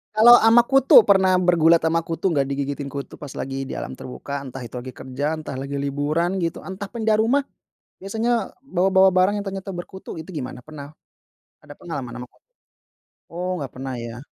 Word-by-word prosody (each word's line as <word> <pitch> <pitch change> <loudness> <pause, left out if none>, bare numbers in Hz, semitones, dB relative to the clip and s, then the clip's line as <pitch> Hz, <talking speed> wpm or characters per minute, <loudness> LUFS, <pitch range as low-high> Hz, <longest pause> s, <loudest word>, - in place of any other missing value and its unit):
Kalau 240 +3 +9
ama 225 +2 +7
kutu, 270 -5 +6
pernah 190 -2 +4
bergulat 170 -2 +4
ama 165 0 +1
kutu 165 +2 -2
enggak? 145 -6 +2
Digigitin 140 0 -4
kutu 140 -1 -7
pas 145 -3 -9
lagi 135 0 -4
di 135 - -8
alam 65 0 -6
terbuka, 140 +2 -7
entah 135 0 -8
itu 120 0 -9
lagi 125 +1 -6
kerjaan, 140 +5 -4
entah 145 -3 -7
lagi 140 +1 -4
liburan 145 +6 -1
gitu, 165 - -2
entah 195 +1 -8
pindah 220 -2 +1
rumah. 275 +4 +1 0.5
Biasanya 225 +2 -2
bawa-bawa 190 -4 +3
barang 185 +3 +3
yang - - -14
ternyata 195 0 -5
berkutu 185 +2 -8
itu 160 +3 -9
gimana? 130 -6 -6
Pernah 150 0 -11 0.6
ada 150 -1 -13
pengalaman 140 -8 -7
ama - - -6
ku - - -31 0.9
oh 180 +1 -3
enggak 140 -4 -5
pernah 130 0 -5
ya. 115 0 -7
160 Hz, 180 wpm, -22 LUFS, 140-190 Hz, 0.9 s, Kalau